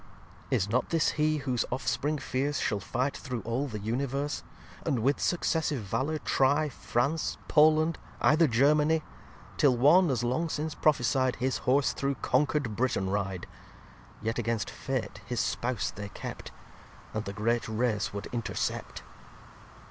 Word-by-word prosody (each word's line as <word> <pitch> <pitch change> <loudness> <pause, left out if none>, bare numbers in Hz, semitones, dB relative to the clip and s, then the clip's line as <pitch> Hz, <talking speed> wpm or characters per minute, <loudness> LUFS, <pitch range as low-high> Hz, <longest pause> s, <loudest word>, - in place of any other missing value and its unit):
xxxi - - +2
Is 95 - +1
not 120 +4 0
this 165 -2 +2
he 155 0 +1
whose 130 -5 0
Offspring 140 +3 -1
fierce 140 +1 -1
Shall 105 - 0
fight 125 +7 -1
through 125 -3 -5
all 120 +5 -2
the 110 -5 -5
Universe; 135 +7 -2 0.4
And 120 -5 0
with 140 +3 +2
successive 160 -7 0
Valour 135 +10 -1
try 145 +1 +2
France, 140 +4 -1
Poland, 155 +1 +4 0.2
either 160 +1 +5
Germany; 150 +5 +3 0.5
Till 135 -4 +4
one, 160 +8 +6
as 125 -3 0
long 130 +8 0
since 155 +1 -2
prophecy'd, 130 -3 +2
His 130 +1 -1
Horse 135 +1 +3
through 140 0 -1
conquer'd 130 -3 0
Britain 100 -5 0
ride? 95 -3 -2 0.8
Yet, 115 +2 -1
against 115 -2 -1
Fate, 135 -3 -4
his 120 -1 -2
Spouse 125 -2 -1
they 100 0 -7
kept; - - -7 0.6
And 110 0 -3
the 100 - -4
great 115 +3 0
Race 110 -1 0
would 100 0 -5
intercept. 120 -2 -3
130 Hz, 145 wpm, -29 LUFS, 115-150 Hz, 0.8 s, one